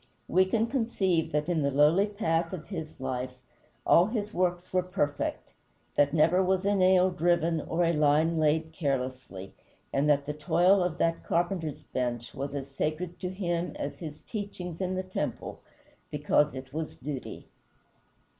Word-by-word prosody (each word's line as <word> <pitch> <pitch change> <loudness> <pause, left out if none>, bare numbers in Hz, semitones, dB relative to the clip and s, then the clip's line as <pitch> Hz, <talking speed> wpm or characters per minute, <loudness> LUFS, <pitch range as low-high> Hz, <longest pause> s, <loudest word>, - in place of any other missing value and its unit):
We 185 +2 +4
can 220 +4 +1
conceive 225 - 0
that 150 +1 0
in 170 -3 +1
the 140 - +2
lowly 150 +8 +4
path 170 -5 -1
of 170 -4 -7
his 160 -5 -6
life 130 -1 -3 0.5
all 175 +3 +6
his 215 -2 -3
works 180 0 -1
were 185 - +3
perfect, 145 -5 -2 0.4
that 145 -1 +3
never 165 +4 +4
was 190 0 +1
a 200 - +3
nail 185 -1 +4
driven 170 -2 +1
or 170 +3 -1
a 170 - +2
line 155 +2 +3
laid 160 +1 +1
carelessly, 130 - -3 0.4
and 140 +2 +2
that 140 -1 +3
the 150 - -3
toil 175 +5 +3
of 180 -2 -1
that 165 -1 0
carpenter's 170 -3 -1
bench 120 -2 -3
was 140 0 -4
as 135 -1 -4
sacred 155 +5 -3
to 180 - -3
him 175 -2 -2
as 145 - -5
his 155 -3 -8
teachings 195 -5 -6
in 185 0 -1
the 185 - -2
temple, 185 0 -4 0.5
because 150 -1 +2
it 130 0 -8
was 160 0 -4
duty. 135 -1 -6
165 Hz, 165 wpm, -29 LUFS, 145-185 Hz, 0.5 s, all